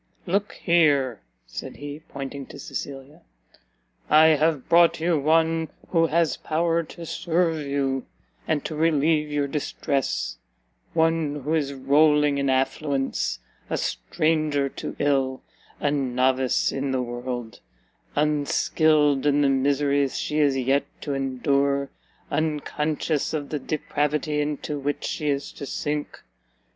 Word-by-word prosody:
"Look 200 +3 0
here," 145 - +2 0.2
said - - -7
he, 145 +1 -7
pointing 140 0 -6
to - - -11
Cecilia, 140 +3 -7 0.9
"I 155 +1 +7
have 155 -2 +2
brought 170 -1 +5
you 165 -1 +2
one 160 +2 +2 0.2
who 165 -2 +3
has 165 0 +1
power 165 +1 0
to 170 +1 -10
serve 165 -1 0
you, 135 -2 -1 0.4
and 150 -2 0
to - - -3
relieve 155 -1 +2
your 145 -1 0
distress: 140 -1 -2 0.6
one 160 -3 +1
who 150 +4 -1
is 140 -3 0
rolling 145 +1 +3
in 140 -1 0
affluence, 135 +1 0 0.3
a - - 0
stranger 155 -4 0
to - - -6
ill, 135 -2 0 0.4
a 145 - +1
novice 130 -2 +1
in 135 0 -2
the 130 -1 0
world; 120 -1 -5 0.6
unskilled 150 -1 +2
in 145 0 +3
the 140 - +4
miseries 140 0 +1
she 150 - -1
is 140 -3 +3
yet 135 +2 +2 0.2
to 145 - -3
endure, 140 +1 0 0.4
unconscious 155 0 -1
of 145 -2 -4
the 150 - -2
depravity 150 0 -1
into 145 0 -3
which 145 +1 -2
she 150 -2 -2
is 140 -1 -1
to 140 - -8
sink! 150 +2 -3
145 Hz, 130 wpm, -25 LUFS, 140-155 Hz, 0.9 s, I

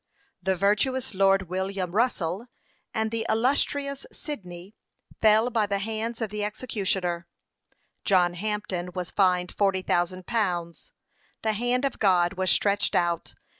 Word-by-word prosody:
The 190 +1 +1
virtuous 210 +7 +1
Lord 195 0 +4
William 190 0 -2
Russel, 205 -2 0 0.4
and 220 -1 -1
the 230 -1 -1
illustrious 280 +4 +1
Sydney, 185 - -8 0.5
fell 220 +2 +5
by 220 -3 +2
the 200 0 0
hands 225 +3 -3
of 220 -3 -2
the 210 0 -2
executioner: 190 -6 -2 0.8
John 180 -3 +3
Hampden 185 -2 -3
was 180 -2 -4
fined 180 -2 +2
forty 195 -2 +1
thousand 180 +1 0
pounds. 175 -7 -2 0.5
The 220 -1 +1
hand 245 +4 +1
of 275 - -2
God 180 -3 +3
was 185 -1 0
stretched 200 +2 +2
out. 170 -1 0
200 Hz, 130 wpm, -26 LUFS, 180-225 Hz, 0.8 s, fell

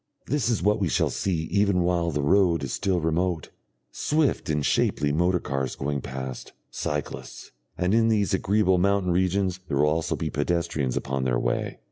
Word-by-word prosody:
This 140 -5 0
is 115 -7 0
what 105 +2 +3
we 95 - +1
shall - - +1
see 85 -5 -1
even 100 -2 +2
while 85 -1 +1
the 75 -2 -2
road 85 -1 +3
is 65 - -3
still 95 -2 0
remote, 80 0 -1 0.4
swift 150 - 0
and 75 -2 0
shapely 75 0 +1
motor 90 +4 +2
cars 70 -3 -3
going 70 0 -2
past, 65 -1 -6 0.2
cyclists, 75 -1 -5 0.3
and 90 +2 +1
in 115 0 +4
these 105 -5 +1
agreeable 95 -1 +2
mountain 100 -1 +2
regions 95 +1 +1
there 70 - -1
will 75 - +4
also 80 +2 0
be 80 -2 -3
pedestrians 75 -3 -1
upon 65 -1 -2
their 60 -2 +1
way. - - -2
85 Hz, 175 wpm, -25 LUFS, 75-95 Hz, 0.4 s, in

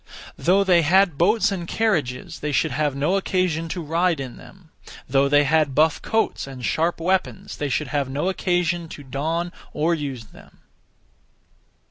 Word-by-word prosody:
Though 190 +3 +3
they 180 -3 +4
had 175 -1 +3
boats 210 +6 +3
and 175 -3 -4
carriages, 155 - -1
they 150 - -3
should 155 +2 +1
have 145 +1 -1
no 150 +8 +1
occasion 180 -4 -1
to 175 0 -4
ride 165 +1 +1
in 130 -3 -6
them; 180 -4 -16 0.4
though 140 +1 +2
they 145 +1 +5
had 150 -1 +2
buff 155 +2 +3
coats 225 -9 -1
and 130 -3 -7
sharp 165 +2 0
weapons, 190 +3 -1
they 145 - -2
should 150 +3 -1
have 140 -3 -1
no 140 +6 -2
occasion 175 -3 0
to 145 - -9
don 160 +6 -2 0.2
or 160 +3 +1
use 140 -7 -4
them. - - -18
160 Hz, 165 wpm, -23 LUFS, 145-180 Hz, 0.4 s, they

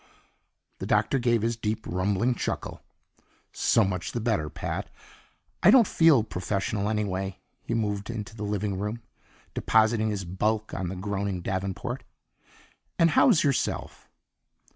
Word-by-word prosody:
The - - -4
Doctor 135 - +2
gave 120 -3 +2
his 115 +1 +1
deep, 110 0 -3
rumbling 100 +7 +1
chuckle. - - -4 0.7
"So 115 - +3
much 95 -3 -2
the 120 - -1
better, 110 -10 0
Pat. - - -4 0.7
I 175 - +7
don't 235 +1 +8
feel 160 - +5
professional 100 +1 -2
anyway." 95 -3 -2 0.2
He 115 - -3
moved 105 -2 -2
into 110 -2 -5
the 105 - -9
living 105 -2 -2
room, 105 +3 -4 0.5
depositing 110 0 +2
his 100 -3 -3
bulk 105 +5 -1
on 90 -2 -3
a 95 - -5
groaning 100 -1 -3
davenport. 95 +8 -3 0.9
"And 165 -1 +4
how's 200 - +5
yourself?" 140 -3 -1
105 Hz, 135 wpm, -27 LUFS, 95-115 Hz, 0.9 s, don't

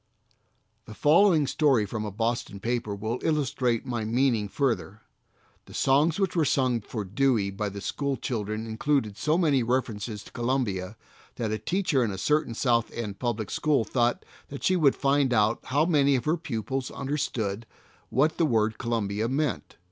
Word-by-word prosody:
The 110 - -10
following 160 - +4
story 135 -6 +2
from 110 +1 -4
a 105 - -4
Boston 115 -1 -2
paper 115 -1 -2
will 110 +4 -3
illustrate 130 -6 0
my 120 -3 -2
meaning 115 -2 +1
further: 115 -5 -1 0.7
"The - - -12
songs 150 +6 +3
which 195 -3 0
were 165 - +3
sung 130 -4 +1
for 105 0 -5
Dewey 110 -1 +1
by 105 +1 -3
the 100 +1 -8
school 140 +6 -2
children 110 -2 -3
included 110 -1 0
so 150 +9 +1
many 150 -7 +3
references 115 -3 -2
to - - -14
Columbia 115 -6 -2 0.4
that 110 -3 -2
a 110 - -2
teacher 175 -7 +1
in 115 - 0
a 95 - -4
certain 150 +2 0
South 115 -2 +1
End 105 -4 -5
public 115 -4 -2
school 145 -6 +2
thought 120 +2 0 0.2
that 140 - -8
she 185 - +3
would 150 -6 +4
find 140 -1 +2
out 110 +1 +2
how 145 +4 +2
many 140 -5 +3
of 125 - -2
her 155 - +2
pupils 130 - -3
understood 120 -7 -3 0.4
what 150 +6 +1
the 165 - +4
word 110 -3 +1
Columbia 110 -2 -1
meant. 135 - -2
120 Hz, 170 wpm, -27 LUFS, 110-140 Hz, 0.7 s, following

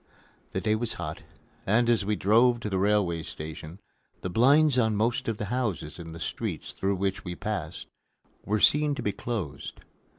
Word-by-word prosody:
The 95 - -1
day 105 - +2
was 110 +1 -1
hot, 80 -3 -5 0.4
and, 115 +4 +3
as 120 -3 +3
we 105 +2 0
drove 120 +5 +4
to 105 - -4
the 95 - +1
railway 95 -4 +2
station, 80 +3 -8 0.4
the 95 - -4
blinds 140 - +5
on 110 -3 +2
most 115 +3 0
of 115 -2 -1
the 105 - -3
houses 95 - -2
in 80 -1 -8
the 80 - -8
streets 75 - -3
through 100 +1 -1
which 95 0 -2
we 90 -2 -5
passed 90 -6 -4 0.6
were 105 +1 0
seen 150 +5 +4
to - - -5
be 105 - +1
closed. 100 - -5
105 Hz, 185 wpm, -27 LUFS, 90-115 Hz, 0.6 s, blinds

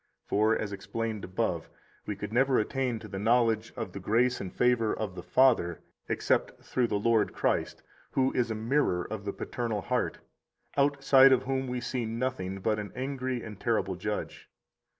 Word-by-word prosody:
65 - - -38
For 110 +2 +3
(as 105 - -3
explained 110 +2 -4
above) 95 - -2 0.4
we 105 - -2
could 105 +2 -6
never 130 +2 +3
attain 125 +2 0
to 110 - -9
the 95 -2 -5
knowledge 115 0 +2
of 115 - -4
the 100 - -5
grace 120 +6 +2
and 95 - -5
favor 125 -3 +2
of 105 -4 -3
the 90 - -7
Father 115 -8 +3 0.3
except - - 0
through 125 -2 +1
the 105 - 0
Lord 110 0 +2
Christ, - - -1 0.3
who 130 0 +2
is 120 -2 +1
a 110 - -2
mirror 110 -5 +1
of 105 -2 -6
the 100 - -1
paternal 115 -4 -3
heart, - - -1 0.6
outside 140 -1 +5
of 130 - +4
whom 135 0 -1
we 125 0 -3
see 120 -1 -2
nothing 110 -5 -3
but 105 +1 +1
an 105 -1 -6
angry 130 -1 -3
and 105 -3 -9
terrible - - 0
Judge. - - -5
115 Hz, 180 wpm, -29 LUFS, 105-130 Hz, 0.6 s, outside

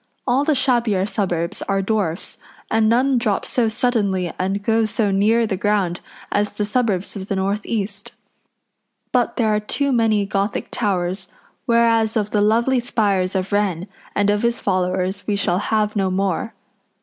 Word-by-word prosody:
All 260 +2 +2
the 300 0 +2
shabbier 235 -7 +2
suburbs 175 -5 -2
are 195 0 +1
dwarfs, 195 -5 -1 0.3
and 220 -1 +3
none 255 +2 +3
drop 215 -4 0
so 240 -3 +1
suddenly 205 -6 0
and 195 +2 -1
go 225 +1 +2
so 215 -1 0
near 220 +4 +3
the 210 -3 -1
ground 190 -3 0 0.3
as 205 0 0
the 210 - -2
suburbs 210 -4 -1
of 195 -1 -6
the 200 - -1
north 200 +2 -1
east. 205 0 -3 1.0
But - - +1
there 220 -4 +2
are 210 - +2
too 280 +6 -1
many 220 -4 +2
Gothic 200 +1 -2
towers; 190 -3 -1 0.4
whereas 230 -1 +3
of 210 -1 -1
the 210 - +2
lovely 235 +5 +3
spires 200 -6 0
of 190 +1 -1
Wren 195 -3 0 0.3
and 205 0 +3
of 205 0 0
his 235 0 +1
followers 185 0 -1
we 210 - +1
shall 180 -2 +1
have 210 0 0
no 195 -2 +1
more. 195 +4 -1
205 Hz, 165 wpm, -21 LUFS, 195-225 Hz, 1.0 s, and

